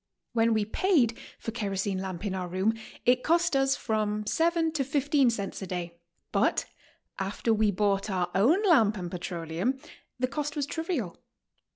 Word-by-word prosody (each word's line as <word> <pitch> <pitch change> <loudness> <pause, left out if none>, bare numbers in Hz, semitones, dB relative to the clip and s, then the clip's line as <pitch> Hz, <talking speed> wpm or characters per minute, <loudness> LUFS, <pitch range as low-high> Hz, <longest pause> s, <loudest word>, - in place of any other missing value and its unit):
When 230 -1 +3
we 215 -1 +1
paid 255 - +2 0.2
for 225 - -5
kerosene 200 -3 -2
lamp 190 0 -5
in 200 - -1
our 185 -1 -3
room, 190 +5 +1 0.3
it 250 0 +4
cost 335 +2 +2
irs 270 0 +3
from 215 -1 -1
7 330 +6 +2
to 305 -3 0
15 285 -1 +2
cents 205 -4 -3
a 190 - -5
day, 175 -1 -5 0.3
but - - +2 0.5
after 200 +4 0
we 215 -1 +3
bought 200 +1 +1
our 180 -2 -1
own 285 - +4
lamp 230 - +4
and 175 -2 -5
petroleum, 175 +6 -2 0.4
the 255 0 +1
cost 295 +2 -3
was 290 -2 0
trivial. 300 - -3
220 Hz, 165 wpm, -28 LUFS, 190-275 Hz, 0.5 s, it